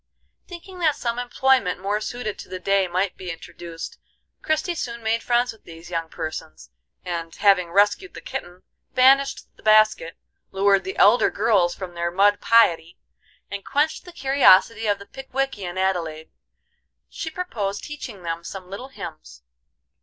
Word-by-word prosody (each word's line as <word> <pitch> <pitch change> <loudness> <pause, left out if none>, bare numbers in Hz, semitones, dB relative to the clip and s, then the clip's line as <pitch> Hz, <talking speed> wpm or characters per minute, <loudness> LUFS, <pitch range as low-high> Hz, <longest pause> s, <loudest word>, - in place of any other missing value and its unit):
Thinking 360 +1 -10
that 310 -4 +2
some 235 0 -3
employment 245 -6 +1
more 205 +3 -1
suited 230 -2 -5
to - - -10
the 185 - -5
day 195 +1 +1
might 185 +2 -1
be 185 - -7
introduced, 165 0 -8 0.4
Christie 315 +3 0
soon 235 -7 -5
made 225 +1 +1
friends 240 0 +1
with 220 - -22
these 165 +1 -12
young 165 -1 -2
persons, 155 - -7 0.3
and, 170 -2 -4
having 195 -4 +3
rescued 205 - +2
the - - -7
kitten, 175 +1 -7 0.3
banished 270 +2 +3
the - - -18
basket, 215 -6 +3 0.3
lured 195 0 +2
the 190 - -5
elder 215 +3 +5
girls 200 -5 +2
from 185 -2 -7
their 170 0 -2
mud 200 +3 +3
piety, 175 -7 +3 0.5
and 200 -1 -5
quenched 300 +2 0
the 355 - -10
curiosity 230 - +4
of 205 -1 +2
the 200 - -12
Pickwickian 260 -7 -4
Adelaide, 170 -5 -2 0.8
she 320 - -6
proposed 215 - -4
teaching 255 -10 -8
them 165 0 -4
some 185 +1 -8
little 245 +7 -6
hymns. 155 - -10
200 Hz, 155 wpm, -23 LUFS, 175-245 Hz, 0.8 s, elder